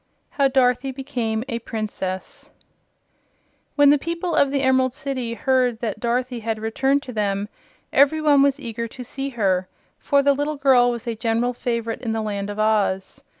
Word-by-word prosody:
How 280 -1 +2
Dorothy 260 0 +2
Became 240 -5 -3
a 235 -3 -3
Princess 210 -5 -5 1.3
When 285 -1 +6
the 295 - +4
people 335 +3 -3
of 280 - +3
the 275 0 -1
Emerald 260 -1 +2
City 265 -5 -4
heard 255 -2 +1
that 215 -3 -3
Dorothy 245 +1 -1
had 225 0 -2
returned 265 +6 0
to 255 - -8
them 205 -1 -1 0.5
every 285 +3 +4
one 295 -2 +4
was 280 0 +3
eager 235 -3 -4
to 250 +2 -9
see 270 +3 -4
her, 190 -7 0 0.3
for 280 0 +2
the 280 0 +4
little 290 +2 -2
girl 260 -3 +4
was 240 0 -4
a 235 - -2
general 230 +2 0
favorite 235 -2 -3
in 225 -3 -2
the 225 - -1
Land 200 -1 -3
of 205 - -6
Oz. 215 +1 0
245 Hz, 175 wpm, -22 LUFS, 220-275 Hz, 1.3 s, When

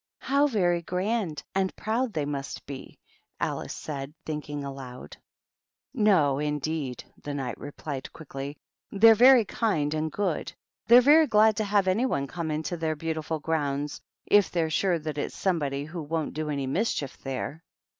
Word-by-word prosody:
" - - -67
How 285 +1 +5
very 175 -9 +1
grand 180 -3 -2
and 190 -1 0
proud 230 +2 -1
they 150 -4 -1
must 140 -1 -5
be 135 -1 -9 0.2
!" - - -47
Alice - - -3
said, 140 -1 -6
thinking 150 -2 -4
aloud. 135 -2 -8 0.8
"No, 180 - +3
indeed," 150 -3 -2 0.2
the 145 -1 -5
Knight 135 -3 -3
replied, 145 -1 -6
quickly. 140 -1 -7 0.3
"They're 225 +3 +7
very 245 +1 +7
kind 160 -10 0
and 155 0 -1
good. 190 -4 -2 0.3
They're 240 +2 +9
very 300 +4 +6
glad 215 -1 +5
to 220 - +1
have 200 -1 +2
any 220 +8 +2
one 140 - -1
come 165 +2 -4
into 155 +3 -2
their 160 -1 -1
beautiful 160 0 -3
grounds, 145 -2 -2 0.2
if 205 -1 +5
they're 165 -2 0
sure 180 +1 +2
that 155 -2 -4
it's - - -3
somebody 145 -7 0
who 165 +2 -6
won't 155 +1 -2
do 155 0 -3
any 140 -2 -1
mischief 145 - -1
there." 135 +4 -5
160 Hz, 165 wpm, -27 LUFS, 145-200 Hz, 0.8 s, They're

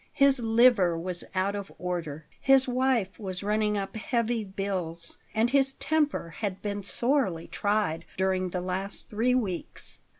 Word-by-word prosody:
His 275 -2 +5
liver 225 -6 +4
was 175 +1 -2
out 190 +2 +1
of 200 -1 -6
order, 165 -4 -4
his 270 -1 +5
wife 250 -6 +1
was 190 -3 -4
running 210 0 +1
up 195 +1 -4
heavy 235 0 0
bills, 185 -4 -4 0.2
and 225 +2 +2
his 270 -1 +3
temper 300 - 0
had 200 -4 -2
been 205 -1 -2
sorely 200 - +1
tried 205 -6 0
during 185 -1 +1
the 180 0 -3
last 185 +2 -3
three 235 +4 +2
weeks. 180 - -3
200 Hz, 145 wpm, -28 LUFS, 180-240 Hz, 0.2 s, His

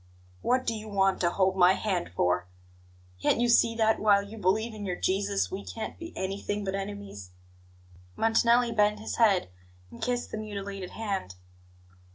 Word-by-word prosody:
What 255 +1 +1
do 230 - 0
you 215 0 -7
want 195 -2 +1
to 175 - +3
hold 190 +1 +1
my 180 0 +6
hand 190 - -2
for? 90 0 +1 0.7
Can't - - +2
you 240 - +3
see 235 -1 +4
that 220 -1 +2
while 205 -2 +4
you 200 +2 -10
believe 215 +3 0
in 210 -1 -7
your 185 -3 -2
Jesus 200 +2 0
we 195 +1 -5
can't 225 - -6
be 335 0 -7
anything 200 +2 -3
but 190 -1 -3
enemies?" 195 - -6 0.9
Montanelli 235 +2 +3
bent 210 -1 +2
his 220 - -5
head 200 - +3 0.4
and - - -12
kissed 245 -1 -2
the 220 - -4
mutilated 200 -3 -6
hand. 195 - -4
205 Hz, 170 wpm, -28 LUFS, 190-225 Hz, 0.9 s, my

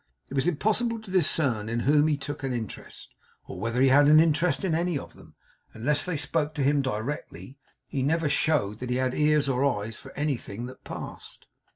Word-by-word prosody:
It - - -5
was 140 +3 +1
impossible 220 +7 +1
to 220 -4 -11
discern 140 - +1
in 120 +1 -1
whom 150 +3 +4
he 150 -2 +1
took 145 +1 -6
an 135 -2 -2
interest, 115 -3 -7 0.3
or - - -8
whether 115 +4 -1
he 135 +1 +5
had 145 +2 +6
an 155 +1 +7
interest 165 0 +2
in 175 - 0
any 170 0 0
of - - -8
them. - - -17 0.4
Unless 145 +7 0
they 180 -4 -2
spoke 150 +1 -1
to 145 - 0
him 140 +1 +3
directly, 130 +2 -5 0.3
he 135 +1 -3
never 160 +4 +1
showed 135 -8 +1
that 125 - -5
he 125 - 0
had 130 0 0
ears 150 -1 +2
or 130 0 +1
eyes 115 -5 -1
for 135 - -12
anything 125 -6 -3
that 130 - -11
passed. - - -8
140 Hz, 205 wpm, -27 LUFS, 125-155 Hz, 0.4 s, an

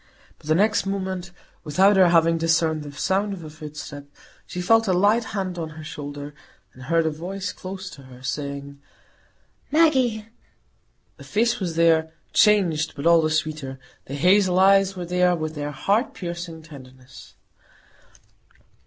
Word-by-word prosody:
But - - -16
the 155 - +3
next 210 +2 +2
moment, 190 -2 -3 0.3
without 190 +7 +4
her 185 -2 +6
having 165 -1 +3
discerned 160 -1 +1
the 145 -1 -8
sound 190 +8 -1
of 180 -4 -8
a 155 - -9
footstep, 150 -2 -9 0.4
she 180 - -6
felt 225 +5 +3
a 185 - +2
light 205 +6 +3
hand 185 -3 -4
on 160 -1 -4
her 155 - -8
shoulder, 145 -1 -7 0.4
and 130 - -15
heard 165 +5 +1
a 160 - +1
voice 185 +5 -5
close 190 +1 -8
to 140 - -12
her 130 -1 -15
saying, 140 +1 -5 0.9
"Maggie!" 260 -9 +2 0.9
The - - -12
face 235 +3 0
was 175 -4 -3
there,—changed, 165 +1 +2
but 140 - -6
all 170 -1 +6
the 155 - 0
sweeter; 155 -4 -2 0.3
the 135 - -6
hazel 185 +3 +3
eyes 195 0 +4
were 180 -1 -5
there, 180 0 +2
with 155 -1 -4
their 145 -1 -4
heart 200 - 0
piercing 170 -4 -6
tenderness. 130 -4 -14
170 Hz, 155 wpm, -23 LUFS, 150-195 Hz, 0.9 s, her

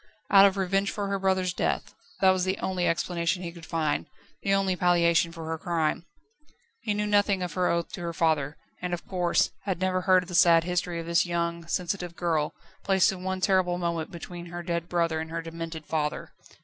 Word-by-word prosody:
Out 200 0 +9
of 195 0 -1
revenge 195 +1 +1
for 205 -1 -3
her 200 0 -1
brother's 190 -1 +1
death - - -1 0.3
that 190 -1 +7
was 185 -1 +1
the 190 +1 0
only 185 -2 -1
explanation 170 +1 0
he 170 - -4
could 170 -2 -12
find, 155 -3 -1 0.3
the 195 - -1
only 195 -1 +2
palliation 170 -2 +3
for 165 -1 -8
her 160 0 -3
crime. 170 -1 -1 0.7
He 215 -4 -1
knew 210 0 0
nothing 205 -2 +2
of 180 - -4
her 180 -1 +1
oath 170 0 0
to 195 - -6
her 170 -1 -3
father, 155 -3 0 0.2
and, 180 -1 -1
of 170 - -12
course, 180 -2 +1
had 190 -4 -1
never 185 0 +1
heard 185 0 +4
of 180 - -13
the - - -7
sad 170 -1 +6
history 175 0 -1
of 165 - -5
this 170 +1 +2
young, 170 -1 -2
sensitive 175 0 -2
girl 160 -4 0 0.3
placed 190 -1 +4
in 185 -2 -7
one 190 0 -2
terrible 185 -2 +2
moment 170 -2 -2
between 175 -1 -8
her 175 0 -6
dead 170 -1 -3
brother 165 -2 +1
and 160 0 -5
her 165 0 -4
demented 165 -1 -6
father. 150 -1 -2
175 Hz, 210 wpm, -27 LUFS, 165-185 Hz, 0.7 s, Out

